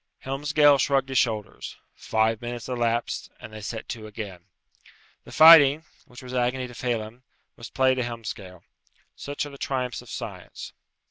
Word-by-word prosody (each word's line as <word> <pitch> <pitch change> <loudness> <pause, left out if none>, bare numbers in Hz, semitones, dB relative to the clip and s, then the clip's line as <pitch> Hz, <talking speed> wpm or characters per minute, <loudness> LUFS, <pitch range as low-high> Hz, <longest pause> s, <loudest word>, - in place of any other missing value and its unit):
Helmsgail 145 +1 +3
shrugged 135 0 +1
his 130 - +2
shoulders. 110 -4 -3 0.2
Five 110 +1 0
minutes 120 -1 -6
elapsed, 120 -2 -2
and 110 - -11
they 110 - -8
set 110 +2 -6
to 110 -2 -6
again. 100 -5 -8 0.8
The - - -13
fighting, 155 -2 +8 0.2
which 125 -2 -13
was 125 0 -9
agony 125 +1 0
to 125 - -10
Phelem, 120 -1 -4 0.3
was 115 - -10
play 130 -1 +2
to 130 - -2
Helmsgail. 110 -7 -7 0.5
Such 145 +1 -5
are 145 - -9
the 140 - -13
triumphs 125 -3 -3
of - - -16
science. - - -8
125 Hz, 155 wpm, -25 LUFS, 110-135 Hz, 0.8 s, fighting